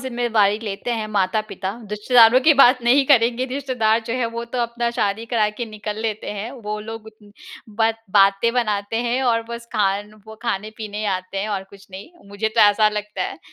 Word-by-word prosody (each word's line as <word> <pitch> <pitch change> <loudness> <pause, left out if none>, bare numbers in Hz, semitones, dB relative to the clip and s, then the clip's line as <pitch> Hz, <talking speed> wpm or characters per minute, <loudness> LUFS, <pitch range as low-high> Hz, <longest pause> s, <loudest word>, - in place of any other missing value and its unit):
ज़िम्मेवारी 235 -5 +1
लेते 210 +2 -5
हैं 220 -2 -2
माता-पिता, 205 -1 -1 0.2
रिश्तेदारों 230 +3 +5
की 305 +3 +5
बात 255 -2 +5
नहीं 265 +4 +4
करेंगे। 245 -2 +3
रिश्तेदार 250 -5 0
जो 230 - -3
है 250 -2 0
वो 235 0 -4
तो 235 +2 -6
अपना 235 0 -2
शादी 210 +3 -1
करा 230 -3 +1
के - - 0
निकल 210 -1 -6
लेते 220 -1 -3
हैं, 210 +3 -5
वो 215 -5 -6
लोग 220 0 -8 0.7
बत 225 0 +1
बातें 195 +3 +4
बनाते 210 -3 -1
हैं 245 +2 -1
और 230 -3 +1
बस 235 0 -7
खान 205 -1 0 0.4
खाने-पीने 215 0 -4
आते 185 +1 -5
हैं 205 +2 -2
और 195 -2 -3
कुछ 195 0 -17
नहीं, 190 - -10 0.2
मुझे 205 +2 -2
तो 220 - 0
ऐसा 210 +1 +5
लगता 210 0 -4
है। - - -5
220 Hz, 180 wpm, -21 LUFS, 205-235 Hz, 0.7 s, रिश्तेदारों